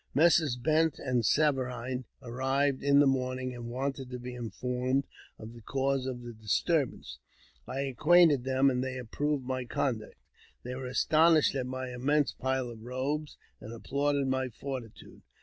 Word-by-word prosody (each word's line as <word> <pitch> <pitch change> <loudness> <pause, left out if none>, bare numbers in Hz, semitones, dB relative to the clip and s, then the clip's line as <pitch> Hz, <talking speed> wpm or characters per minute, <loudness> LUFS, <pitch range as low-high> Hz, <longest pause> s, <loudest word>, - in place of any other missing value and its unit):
Messrs. 155 -3 +4
Bent 155 +5 +1
and 125 -3 0
Saverine 130 -2 0 0.2
arrived 135 +3 0
in 140 0 +4
the 145 - +6
morning, 130 -1 0
and 120 -1 -7
wanted 135 +1 -3
to 125 - -5
be 125 0 -7
informed 125 +3 -2 0.3
of 110 +1 -10
the 120 - -12
cause 135 +2 -1
of 125 -2 -5
the 120 0 -8
disturbance. 110 - -1 0.5
I 135 - -3
acquainted 150 +1 +4
them, 135 +1 +3
and 125 0 -1
they 130 -1 -4
approved 135 +3 -2
my 130 0 -2
conduct. 120 -3 -2 0.5
They 125 - -5
were 130 0 -5
astonished 155 +4 +4
at 130 -2 -2
my 130 0 -5
immense 145 +4 +1
pile 130 -1 -2
of 115 -2 -11
robes, 135 +5 -3 0.2
and 110 - -9
applauded 140 +4 -1
my 130 0 0
fortitude. 125 -2 -8
130 Hz, 155 wpm, -30 LUFS, 125-140 Hz, 0.5 s, the